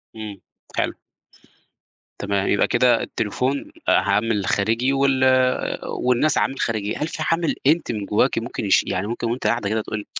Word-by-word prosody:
إمم 105 -3 -7 0.4
حلو. - - 0 1.3
تمام، 100 -1 -1
يبقى 100 - +2
كده 120 -1 +3
التليفون 130 - -2 0.2
عامل 105 0 +2
خارجي، 115 +8 +1
وال 135 -1 +2 0.6
والناس 125 +4 +1
عامل 135 - 0
خارجي، 110 -2 -1
هل 150 - -2
في 160 -1 -4
عامل 165 -1 +1
أنتِ 160 -1 +2
من 105 -3 -4
جواكِ - - +1
ممكن - - -5
يش - - +4
يعني 95 +3 -2
ممكن 115 +1 -3
وأنتِ 125 - -2
قاعدة 110 -4 0
كده 110 +1 0
تقولي 105 -1 -5
115 Hz, 155 wpm, -22 LUFS, 105-135 Hz, 1.3 s, يش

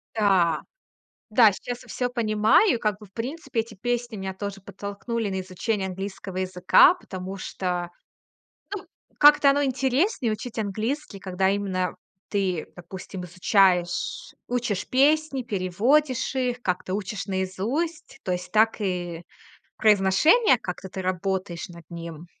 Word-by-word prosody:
Да. 190 -6 +3 0.7
Да, 215 -1 +6
сейчас 245 +5 -6
я - - -18
всё 250 - -1
понимаю. 225 - +3
Как 210 -2 0
бы, 210 - -13
в 195 - -27
принципе, 255 - -3
эти 225 0 -7
песни 240 +2 -2
меня 190 -1 -4
тоже 200 0 -5
подтолкнули 205 +3 -4
на 190 -1 -2
изучение 190 +2 -2
английского 190 0 -6
языка, 185 - +5
потому 190 - -7
что, 180 -2 -3 0.9
ну, 385 -1 -8 0.3
как-то 295 -1 +7
оно 285 +1 +3
интереснее 265 - +1
учить 225 +1 -5
английский, 220 +4 -3
когда 190 0 0
именно 190 -3 -1 0.3
ты, 190 -5 -1
допустим, 180 +1 -8
изучаешь, 180 0 +1
учишь 240 -6 -2
песни, 280 +1 +3
переводишь 240 +8 +1
их, 250 -1 -1
как-то 185 -2 -2
учишь 200 0 -3
наизусть. 200 - -3
То 185 - -2
есть 180 0 -3
так 220 +1 +3
и 175 -3 -3 0.5
произношение, 215 - +5
как-то 190 -1 -6
ты 190 +1 -6
работаешь 185 -1 -2
над 170 -1 -12
ним. 170 -1 -8
200 Hz, 130 wpm, -25 LUFS, 185-245 Hz, 0.9 s, как-то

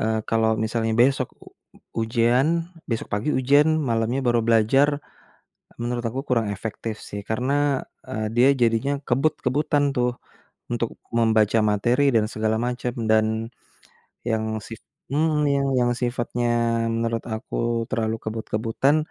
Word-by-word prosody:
eee, 110 0 0
kalau 115 0 +2
misalnya 115 0 -1
besok 130 -1 +2 0.7
ujian, 120 +4 +2 0.4
besok 115 - -2
pagi 105 +9 0
ujian, 140 +3 +4 0.2
malamnya 115 +3 0
baru 120 -1 +3
belajar, 115 +5 +4 0.9
menurut 120 0 -2
aku 130 +4 -4
kurang 115 -4 +2
efektif 110 +2 -5
sih 100 - -5
karena 125 +5 0 0.6
eee, 110 -4 -2
dia 125 +3 +6
jadinya 115 +4 +2 0.2
kebut-kebutan 145 +2 +1
tuh, 125 0 +2 0.6
untuk 120 -1 0 0.3
membaca 110 -1 +3
materi 120 +7 +2
dan 110 -1 +3
segala 110 0 0
macam 125 0 -2 0.2
dan 110 0 +4 1.0
yang 110 -1 0 0.2
sif 115 - -9 0.3
mhm, 145 -2 +2
yang 120 0 +2
sifatnya 120 -1 -1 0.5
menurut 115 0 -1
aku 110 - -6 0.3
terlalu 115 -3 -1
kebut-kebutan, 115 +5 0
120 Hz, 120 wpm, -24 LUFS, 110-130 Hz, 1.0 s, dia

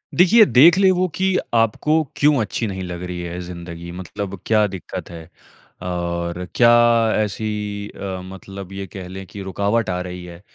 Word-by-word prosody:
देखिए 200 +6 +7
देख 165 +3 +6
ले 195 -1 +5
वो 185 0 +1
कि 190 0 +1 0.2
आपको 120 +8 +2
क्यों 150 0 +4
अच्छी 110 +1 -2
नहीं 95 -2 -4
लग 90 -1 -6
रही 90 -1 -5
है 85 0 -5
ज़िंदगी 85 -1 -8
मतलब 95 +2 -6
क्या 110 -1 +3
दिक्कत 95 -2 -7
है? 80 -2 -10 0.5
और 85 0 -3
क्या 120 -1 +6 0.5
ऐसी 110 +1 -3 0.4
अ, 95 -2 -6
मतलब 95 0 -9
ये 100 0 -5
कह 95 0 -8
लें 95 +1 -8
कि 100 - -9
रुकावट 100 +3 0
आ 90 0 -1
रही 90 0 -7
है? 85 0 -11
95 Hz, 170 wpm, -21 LUFS, 90-115 Hz, 0.5 s, देखिए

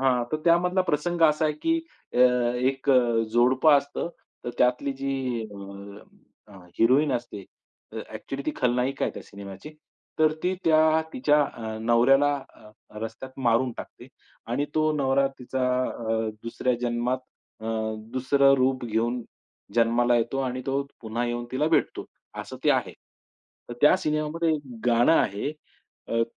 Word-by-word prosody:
हां, 125 -2 +2
तर - - +2
त्यामधला 180 +2 +3
प्रसंग 170 +1 -1
असा 155 0 +4
आहे 155 - +2
की 330 0 +2 0.4
अ, - - 0 0.4
एक 135 +2 0
अ, 120 -3 +3
जोडपं 130 +6 +4
असतं. 140 +4 -5 0.4
तर 120 - -3
त्यातली 125 +3 +2
जी 135 0 -1 0.4
अ, - - -11 1.0
अ, 95 - -13 0.2
हिरोईन 130 +5 +4
असते 120 -5 -4 0.5
अ, - - -8 0.2
ॲक्चुअली 135 +1 -6
ती - - +2
खलनायिका 125 +2 0
आहे - - -2
त्या - - -8
सिनेमाची. 100 +7 -10 0.5
तर 155 -1 +4
ती 180 +1 +1
त्या 160 0 +4
तिच्या 150 +3 +3
अ, 110 -1 -6
नवऱ्याला 135 +5 +4 0.2
अ, 105 - -16 0.3
रस्त्यात 115 +4 -8
मारून 120 +2 +2
टाकते - - -10 0.4
आणि 140 +4 0
तो 155 0 +2
नवरा 135 -1 +2
तिचा 130 +1 -2 0.2
अ, 110 -2 -2
दुसऱ्या 125 +2 -1
जन्मात 120 +1 0 0.4
अ, 110 - -7 0.5
दुसरं 135 +2 +4
रूप 130 -1 +1
घेऊन 120 +2 -1 0.5
जन्माला 120 +1 +3
येतो 120 +3 -1
आणि 130 -1 -2
तो 135 +1 0 0.2
पुन्हा 115 +2 -3
येऊन 120 0 -3
तिला 140 +4 +1
भेटतो 160 - 0 0.4
असं - - -9
ते - - +5
आहे. - - +1 0.8
तर 120 - -6
त्या 150 - +6
सिनेमामध्ये 155 0 -1
एक 150 - -3 0.3
गाणं 120 +5 +4
आहे, 105 -5 +1 0.6
अ, 115 0 +1
130 Hz, 150 wpm, -26 LUFS, 120-150 Hz, 1.0 s, त्या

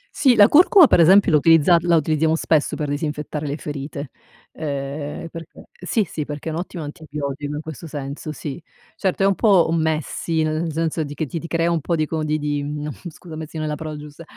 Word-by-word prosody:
Sì, 260 -4 +4
la 205 -1 +8
curcuma, 355 +2 +7
per 180 - +4
esempio, 190 +2 +6
la 150 - +6
utilizza 165 +2 +5
la 170 0 +3
utilizziamo 160 +1 +2
spesso 160 -2 +1
per 150 -2 -3
disinfettare 150 0 -3
le 145 +2 -3
ferite. 140 -1 -6 0.4
Ehm, 145 +1 -5
perché 165 -1 -11
sì, 195 +5 -1
sì, 150 - -4
perché 150 +2 -6
è - - -3
un 160 - -3
ottimo 175 -2 -6
antibiotico 145 -2 -5
in 150 - -4
questo 160 +1 -8
senso, 145 +1 -6
sì, 150 +1 -7 0.3
certo, 195 0 -1
è - - +5
un 195 - +4
po' 195 -5 +4
un 165 -1 +1
messy, 160 +1 -1
nel 155 +1 -1
senso 160 0 -1
di 145 0 -7
che 155 - -2
ti 165 +4 -5
ti 170 - -8
crea 170 +1 0
un 165 -3 0
po' 170 +3 -1
di 155 - 0
co 155 0 -3
di 155 0 0
di 145 -1 -2
uhm, 150 +1 -4 0.2
scusa 160 0 -11
messy 160 0 -7
non 155 - -2
è 155 - -2
la - - -2
parola 155 0 -6
giusta, 150 +2 -11
155 Hz, 225 wpm, -21 LUFS, 150-165 Hz, 0.4 s, la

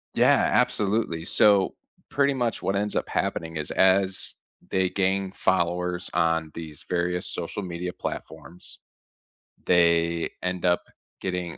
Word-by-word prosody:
Yeah, - - +4
absolutely. 100 -6 +1
So 100 0 +4 0.3
pretty 140 0 +2
much 120 -4 -1
what 95 - -1
ends 105 +1 -1
up - - -1
happening 80 0 -2
is 75 -1 -3
as 95 0 +2 0.3
they 95 -1 +1
gain 95 0 0
followers 90 -1 0
on 80 -1 +1
these 80 -3 -8
various 90 0 -1
social 90 +4 -4
media 90 0 -5
platforms, 90 - -8 0.9
they 85 -1 +3
end 90 -1 -2
up 90 -1 +2 0.4
getting 90 -2 -3
90 Hz, 125 wpm, -25 LUFS, 85-95 Hz, 0.9 s, Yeah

